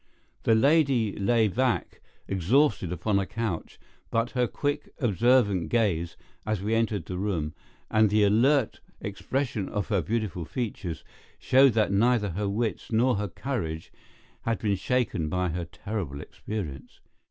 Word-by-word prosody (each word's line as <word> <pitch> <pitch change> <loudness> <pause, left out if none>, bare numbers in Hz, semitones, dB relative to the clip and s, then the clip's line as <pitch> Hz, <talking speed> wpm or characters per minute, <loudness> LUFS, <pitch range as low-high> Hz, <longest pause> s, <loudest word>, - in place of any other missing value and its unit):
The 115 - +3
lady 135 -4 +3
lay 110 +2 +3
back 125 +4 -1 0.3
exhausted 100 - +2
upon 100 +3 0
a 95 - -2
couch, 110 -5 -4 0.3
but 115 +1 0
her 125 -2 +1
quick, 145 +4 -2
observant 115 - +2
gaze, 90 -8 0 0.3
as 110 -1 -1
we 105 +4 -1
entered 110 -6 0
the 90 +1 -5
room, 85 -7 -1 0.4
and 110 -1 +4
the 105 +1 +3
alert 125 +8 +3 0.2
expression 110 +1 -3
of 105 0 -3
her 100 -5 +2
beautiful 105 -4 -2
features, 95 - -4 0.3
showed 130 -1 +5
that 110 -2 +2
neither 105 0 +2
her 100 +3 -2
wits 110 +3 -2
nor 120 +1 +3
her 105 +1 -1
courage 90 - -4 0.5
had 115 -1 -1
been 105 -2 0
shaken 95 -6 0
by 90 +1 0
her 85 +1 -3
terrible 90 -7 -5
experience. 80 -3 -7
105 Hz, 140 wpm, -27 LUFS, 95-120 Hz, 0.5 s, showed